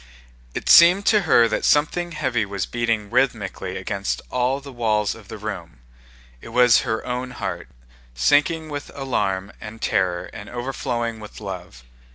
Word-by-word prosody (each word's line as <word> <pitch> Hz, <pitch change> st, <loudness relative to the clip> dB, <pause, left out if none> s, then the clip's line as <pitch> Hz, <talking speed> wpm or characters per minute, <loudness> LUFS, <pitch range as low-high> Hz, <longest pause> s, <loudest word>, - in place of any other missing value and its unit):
It -, -, -4 dB
seemed 180 Hz, +4 st, +7 dB
to 210 Hz, -2 st, +4 dB
her 115 Hz, -1 st, +6 dB
that 110 Hz, -, -2 dB
something 170 Hz, +4 st, +2 dB
heavy 120 Hz, -6 st, 0 dB
was 100 Hz, -1 st, -3 dB
beating 115 Hz, -3 st, -2 dB
rhythmically 110 Hz, -7 st, -1 dB
against 100 Hz, +1 st, -3 dB
all 125 Hz, +2 st, +1 dB
the 140 Hz, -1 st, -11 dB
walls 110 Hz, -3 st, 0 dB
of 110 Hz, -3 st, -14 dB
the 110 Hz, -, -8 dB
room: 95 Hz, -, -6 dB, 0.6 s
it -, -, -10 dB
was 125 Hz, -2 st, +5 dB
her 110 Hz, -2 st, -3 dB
own 125 Hz, +1 st, -3 dB
heart, 125 Hz, -, -5 dB, 0.5 s
sinking 150 Hz, -, +2 dB
with 145 Hz, -1 st, -6 dB
alarm 100 Hz, -8 st, -2 dB
and 110 Hz, +1 st, -9 dB
terror 90 Hz, -4 st, 0 dB
and 100 Hz, -, -9 dB
overflowing 120 Hz, -2 st, -3 dB
with 105 Hz, -1 st, -10 dB
love. 90 Hz, -, -8 dB
115 Hz, 155 wpm, -22 LUFS, 100-130 Hz, 0.6 s, seemed